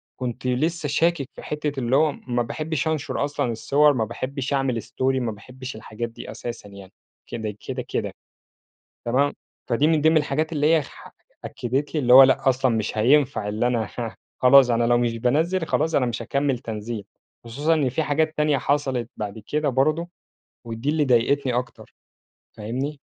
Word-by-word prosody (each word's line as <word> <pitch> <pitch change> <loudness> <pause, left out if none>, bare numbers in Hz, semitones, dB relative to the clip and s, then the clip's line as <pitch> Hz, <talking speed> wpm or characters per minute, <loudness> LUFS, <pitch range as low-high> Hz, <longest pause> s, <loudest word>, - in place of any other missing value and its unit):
كنت 125 0 -4
لسَّه 150 +5 0
شاكك 150 -2 +1
في - - -11
حتّة 150 -2 -3
اللي 125 +2 +1
هو 155 +1 +4
ما 120 -3 -3
باحبِّش 155 +4 -3
أنشُر 155 -2 -1
أصلًا 140 -4 -2
الصور، 145 +6 +3
ما 115 -4 0
باحبِّش 135 +4 -4
أعمل 130 -4 0
story، - - -15 0.2
ما 115 -2 -1
باحبِّش 130 +5 -9
الحاجات 110 +2 -6
دي 115 - -9
أساسًا 115 -4 -7
يعني 100 -2 -12 0.4
كده 110 -3 -5
كده - - -3
كده. - - -2 0.9
تمام، 135 +4 +2 0.3
فدي 135 +6 +2
من 160 -2 +2
ضمن 160 +1 +4
الحاجات 155 +2 0
اللي 150 +1 +2
هي 160 - +3
ح - - -13 0.3
أكَّدت 135 +6 -3
لي 155 - +1
اللي 125 -2 +4
هو 135 +1 +11
لأ، 130 0 +3
أصلًا 130 -2 +1
مش 110 0 -2
هينفَع 120 -2 +3
إن 110 +3 -2
أنا 120 -4 0
ه 115 -2 -4 0.2
خلاص، 130 0 +7
أنا 120 0 +2
لو 120 0 +3
مش 120 -1 0
بانزِل 160 +9 +1
خلاص 160 0 0
أنا 125 - +3
مش 120 -2 -3
هاكمّل 140 -3 -1
تنزيل، 110 -2 -5 0.4
خصوصًا 145 +8 0
إن 145 -5 +1
في 145 +6 -1
حاجات 155 +2 0
تانية 150 -2 +2
حصلت 135 -3 -1
بعد 105 0 -5
كده 150 -1 0
برضه، 155 +7 +1 0.6
ودي 115 +4 -5
اللي 150 -1 +2
ضايقتني 130 +1 +2
أكتر، 125 +1 -5 0.6
فاهمني؟ 130 +7 -4
130 Hz, 175 wpm, -23 LUFS, 120-150 Hz, 0.9 s, هو